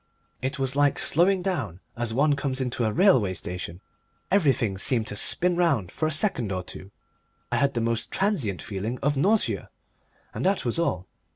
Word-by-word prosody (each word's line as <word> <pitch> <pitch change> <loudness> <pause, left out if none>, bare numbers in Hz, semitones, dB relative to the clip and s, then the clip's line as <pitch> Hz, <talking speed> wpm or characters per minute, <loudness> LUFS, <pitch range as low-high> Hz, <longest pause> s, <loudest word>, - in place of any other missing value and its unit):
It 135 +3 -2
was 135 -1 -1
like 145 -1 +3
slowing 180 +3 +2
down 135 - -2 0.2
as 120 -1 -2
one 145 +5 +3
comes 135 -2 -2
into 125 -2 -1
a 110 - +1
railway 115 - +3
station. 90 0 -6 0.5
Everything 135 - +2
seemed 115 +1 +1
to 105 - -5
spin 180 - +2
round 155 - +1
for 155 - -1
a - - -1
second 140 - +1
or 90 -1 -2
two, 95 +2 -10 0.6
I - - +1
had 140 -1 +1
the 120 - 0
most 115 0 -1
transient 160 - -1
feeling 105 +4 -4
of 145 +1 +2
nausea, 200 +10 +1 0.6
and - - -4
that 190 -4 +1
was 120 +7 0
all. 95 - -1
130 Hz, 180 wpm, -26 LUFS, 110-165 Hz, 0.6 s, like